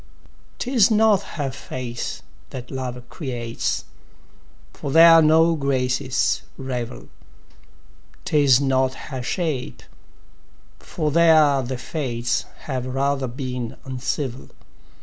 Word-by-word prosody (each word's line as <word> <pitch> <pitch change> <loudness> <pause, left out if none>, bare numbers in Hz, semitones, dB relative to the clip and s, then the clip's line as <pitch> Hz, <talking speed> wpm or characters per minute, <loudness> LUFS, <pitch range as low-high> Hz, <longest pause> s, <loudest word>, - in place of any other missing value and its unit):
'Tis 245 -5 +3
not 215 -2 +4 0.2
her 140 -3 -2
face 125 -2 -6 0.3
that 125 -1 -8
love 125 -2 -5
creates, 120 -7 -3 0.9
For - - -6
there 165 +2 +8
no 160 +2 +4
graces 130 -2 0 0.2
revel; 125 - -5 1.2
'Tis 140 -4 +4
not 130 -1 +1
her 130 -2 -7
shape, 145 -1 -3 1.0
for 155 -3 -3
there 155 -4 +5
the 130 0 -4
fates 120 -4 -2 0.2
Have 130 -3 -3
rather 135 +1 0
been 125 -2 -5
uncivil. 130 0 -4
135 Hz, 95 wpm, -22 LUFS, 125-155 Hz, 1.2 s, there